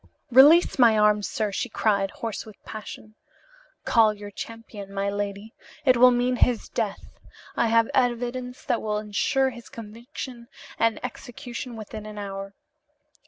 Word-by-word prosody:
"Release 290 +6 +7
my 230 -3 +6
arm, 210 0 +4
sir!" 210 +1 -2
she 245 - -3
cried, 200 -2 +1
hoarse 225 +1 -5
with 215 -2 -13
passion. 215 0 -9 0.7
"Call 220 -3 +4
your 205 0 -9
champion, 215 -2 -8
my 200 0 -1
lady. 205 +1 -4 0.3
It 255 -2 +6
will 250 +1 +7
mean 250 0 +1
his 240 -2 +2
death. 215 -4 -4 0.4
I 235 - +2
have 230 0 +4
evidence 250 0 -1
that 235 - 0
will 210 -1 -1
insure 260 +6 0
his 235 -1 -12
conviction 235 +2 -9 0.3
and 230 -1 +2
execution 245 -1 -7
within 215 -1 -8
an 210 0 -9
hour. 195 -1 -6
225 Hz, 145 wpm, -25 LUFS, 210-245 Hz, 0.7 s, Release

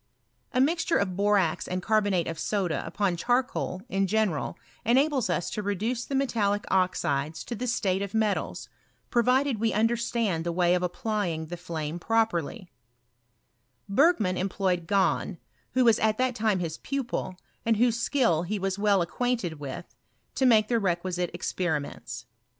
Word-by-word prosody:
A 255 - 0
misture 325 +4 +2
of 185 -3 -1
boi 205 +2 +3
ax 170 -4 0
aiid 185 0 -3
carbonate 205 -5 +2
of 165 -1 -4
soda 190 -6 -1
upoa 200 -4 0
charcoal 240 -2 -1
in 195 0 0
general 210 -6 0 0.3
enables 265 0 +2
us 175 - -1
to 210 - -3
reduce 215 +5 -2
the 275 - -3
metallic 210 -7 +1
oxides 160 -5 0
to - - -6
the 245 +2 -3
state 200 -5 0
of 200 +1 -4
metals, 215 -2 -1 0.4
provided 250 +1 +2
we 225 0 +1
understand 225 -5 +1
the 170 - -1
way 175 0 +3
of 180 - +1
applying 180 -3 -2
the 170 +3 -6
flame 165 -2 -5
properly, 190 -5 0 1.2
Bergman 210 - +3
employed 185 -2 -1
Gahn, 195 0 +1 0.4
who 255 -1 +4
was 230 -2 +5
at 215 0 +2
that 255 0 +1
time 220 -4 +1
his 165 -3 -4
pupil, 255 -8 -3 0.3
and 225 -1 +2
whose 235 0 +2
skill 235 - +2
he 195 +5 -2
was 195 0 -2
well 200 -3 +3
acquainted 200 -5 -2
with, 140 -3 -6 0.5
to 265 - +2
make 215 -3 +5
tite 235 - +3
requisite 180 -1 -1
experiments. 150 -7 -3
200 Hz, 155 wpm, -27 LUFS, 180-235 Hz, 1.2 s, was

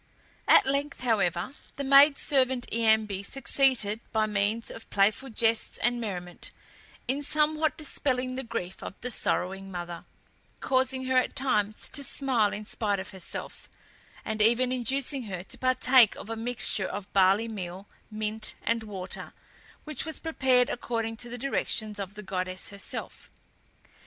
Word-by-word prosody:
At - - +7
length, 280 +1 -1
however, 200 -3 0 0.2
the 280 - -4
maid 275 +1 +7
servant 260 -3 +2
Iambe 220 -3 +2
succeeded, 260 -3 +1
by 220 -1 +2
means 210 +2 -1
of 225 - -11
playful 205 +7 +2
jests 225 -1 0
and 240 0 0
merriment, 180 -5 -5 0.6
in 270 +3 0
somewhat 305 +1 +3
dispelling 260 -4 -1
the 265 - -3
grief 230 -7 -5
of - - -7
the 250 - -3
sorrowing 195 -2 0
mother, 175 -1 -6 0.5
causing 260 0 +1
her 260 0 +2
at 255 - +1
times 215 -6 0
to 285 - -4
smile 255 -7 +1
in 210 0 -5
spite 205 -2 0
of 190 - -6
herself, 190 -2 -6 0.6
and 220 0 -2
even 240 +3 +4
inducing 260 +1 -1
her 185 -4 -5
to - - -6
partake 255 -2 +5
of 225 - -8
a - - -2
mixture 225 -4 0
of 200 0 -7
barley 195 +3 +4
meal, 190 -2 -6 0.2
mint, 215 0 -4
and 230 0 +1
water, 195 -4 -7 0.5
which 305 -4 -4
was 320 0 -3
prepared 265 -6 +2
according 230 -2 -3
to 240 +1 -4
the 245 - -6
directions 220 -5 -1
of 200 0 -5
the 210 - -8
goddess 185 -1 -1
herself. 200 0 -6
225 Hz, 150 wpm, -28 LUFS, 200-260 Hz, 0.6 s, At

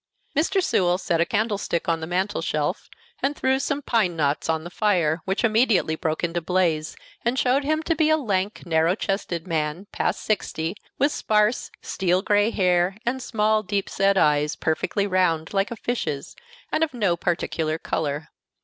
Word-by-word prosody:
Mr. 345 +6 +2
Sewell 180 - +2
set 180 -2 0
the 170 - +2
candlestick 205 -5 -1
on 165 -1 +1
the 160 - -5
mantel 185 +4 -1
shelf, - - -2 0.3
and 280 +2 0
threw 265 -1 +1
some 285 +1 -2
pine 210 -9 +1
knots 145 -1 0
on 160 -1 0
the 175 - -8
fire, 175 -7 +1
which 195 +2 -1
immediately 220 -7 +3
broke 160 0 -2
into 170 0 0
a - - -13
blaze, 165 -3 0 0.3
and 240 +2 0
showed 265 +2 +2
him 310 +2 0
to 330 - +1
be 315 -1 +2
a 315 - +4
lank, 205 -7 -1
narrow 165 +1 +2
chested 195 -5 -2
man, 160 +1 -2
past - - -1
sixty, 170 -5 -1 0.2
with 285 +2 +3
sparse, 215 0 +1
steel 185 0 0
gray 205 +1 +3
hair, 180 -2 +2
and 260 +2 -1
small, 215 -3 +1
deep 200 -1 -2
set 195 0 +2
eyes, 150 -2 +3
perfectly 160 +5 0
round, 180 -4 +1
like 195 +1 +1
a 235 - -5
fish's, 220 - -3 0.4
and 320 - +2
of 300 -5 -2
no 200 -7 +2
particular 165 -3 -1
color. 150 -2 -3
190 Hz, 175 wpm, -24 LUFS, 165-225 Hz, 0.4 s, a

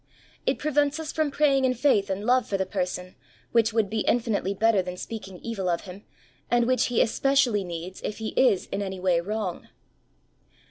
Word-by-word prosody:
It - - +2
prevents 290 0 +1
us 315 -1 -4
from 310 -2 0
praying 275 -2 +2
in 255 -1 +2
faith 225 -6 +2
and 195 +2 -3
love 250 +1 +3
for 195 - -1
the 190 - 0
person, 185 -1 -3 0.4
which 230 -1 +3
would 220 -2 +1
be 220 +2 -2
infinitely 215 -4 0
better 220 0 +3
than 180 0 -6
speaking 195 -3 -7
evil 200 -6 -2
of 170 -1 0
him, 195 +2 -11 0.4
and 240 0 +3
which 255 +1 +2
he 245 - +3
especially 250 -4 +2
needs, 175 +1 -7
if 210 - -4
he 220 -1 -3
is 230 -8 +3
in 200 - -2
any 190 -1 -4
way 180 -2 +2
wrong. 205 -1 -4
215 Hz, 190 wpm, -26 LUFS, 190-250 Hz, 0.4 s, love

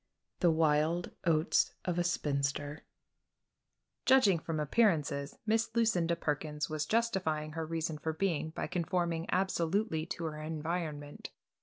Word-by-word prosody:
THE 175 - +4
WILD 160 +1 +2
OATS 160 -1 +2
OF 175 -1 0
A - - +3
SPINSTER 145 -3 -1 1.3
Judging 235 -10 +6
from 160 -1 -3
appearances 150 -5 +1
Miss 225 +1 +2
Lucinda 180 -8 +2
Perkins 150 -1 -2
was 155 -1 -2
justifying 185 -10 0
her 160 0 -4
reason 160 -1 -2
for 160 +2 -1
being 160 -2 -1
by 160 - -4
conforming 170 -1 -1
absolutely 180 -2 0
to 170 - -4
her 155 -1 -4
environment. 155 -2 -4
160 Hz, 125 wpm, -32 LUFS, 155-180 Hz, 1.3 s, Judging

